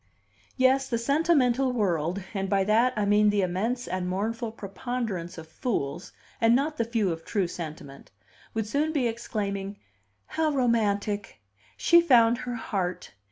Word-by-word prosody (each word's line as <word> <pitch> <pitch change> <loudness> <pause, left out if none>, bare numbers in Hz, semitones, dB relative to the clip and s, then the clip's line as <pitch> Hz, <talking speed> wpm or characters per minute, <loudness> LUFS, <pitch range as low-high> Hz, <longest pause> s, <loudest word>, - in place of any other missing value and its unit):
Yes, 265 +1 +3
the 235 - 0
sentimental 270 -1 +2
world 185 -4 0
(and 195 -2 -2
by 195 -1 +2
that 225 +5 +3
I 210 -1 0
mean 210 +1 +4
the 205 -1 +2
immense 215 +7 -1
and 180 0 -2
mournful 220 +5 -2
preponderance 200 -4 -4
of 160 -1 -9
fools, 160 - -3 0.3
and 230 +1 +5
not 300 +4 0
the 230 - 0
few 225 -5 0
of 165 0 -5
true 200 -5 -1
sentiment) 155 -5 -8 0.5
would 220 -1 0
soon 295 +8 0
be 265 -6 +1
exclaiming: 200 -3 -4 0.5
"How 315 - 0
romantic! 210 - 0 0.4
She 340 - +5
found 240 -7 +5
her 245 -1 -4
heart! 190 -6 -3
215 Hz, 150 wpm, -27 LUFS, 190-245 Hz, 0.5 s, and